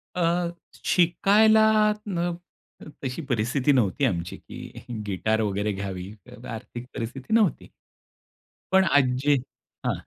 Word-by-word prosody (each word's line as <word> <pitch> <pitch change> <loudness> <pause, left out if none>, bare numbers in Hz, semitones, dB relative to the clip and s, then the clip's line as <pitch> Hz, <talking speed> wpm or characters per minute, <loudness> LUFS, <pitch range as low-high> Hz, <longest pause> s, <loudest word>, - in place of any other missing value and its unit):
अ, 175 0 +1 0.4
शिकायला 215 +5 +5 0.2
अ, - - +1
न 175 -2 -1 0.7
तशी 130 +5 -3
परिस्थिती 125 +4 +1
नव्हती 125 +2 +2
आमची, 85 -8 -2
की - - -11 0.2
गिटार 110 +3 0
वगैरे 105 0 -1
घ्यावी 95 -1 -5 0.3
आर्थिक 120 +2 -7
परिस्थिती 130 - -5
नव्हती. 220 -6 +2 1.0
पण 190 0 +6
आज 145 -2 +5 0.2
जे 145 -1 +4 0.5
हां. - - +2
135 Hz, 115 wpm, -25 LUFS, 110-175 Hz, 1.0 s, पण